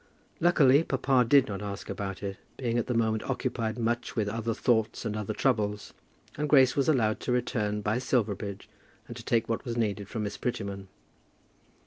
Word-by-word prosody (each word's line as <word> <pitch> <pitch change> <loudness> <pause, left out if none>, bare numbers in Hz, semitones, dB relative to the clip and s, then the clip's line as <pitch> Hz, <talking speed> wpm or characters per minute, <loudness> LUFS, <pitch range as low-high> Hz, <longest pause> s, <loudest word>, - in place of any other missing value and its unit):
Luckily 150 -5 +5
papa 135 -3 +2
did 135 +1 +5
not 100 -1 -5
ask 100 -1 -6
about 95 -1 -5
it, 100 -1 -4 0.2
being 120 -2 0
at - - -2
the 125 - -1
moment 110 -1 +1
occupied 115 -3 -2
much 120 +1 -1
with 110 -3 0
other 115 +1 -2
thoughts 115 -1 +1
and 105 -2 -2
other 105 -2 -3
troubles, 105 -6 0 0.5
and 150 0 -1
Grace 130 -3 +6
was 140 +1 +2
allowed 110 -8 +2
to - - -3
return 105 -4 0
by 105 +4 0
Silverbridge, 105 -5 -1 0.4
and - - -8
to - - -9
take 115 -1 +1
what 115 - -2
was 120 -3 -4
needed 105 -3 -1
from 110 - -3
Miss 105 - -4
Prettyman. 100 -5 -4
115 Hz, 180 wpm, -28 LUFS, 105-125 Hz, 0.5 s, Grace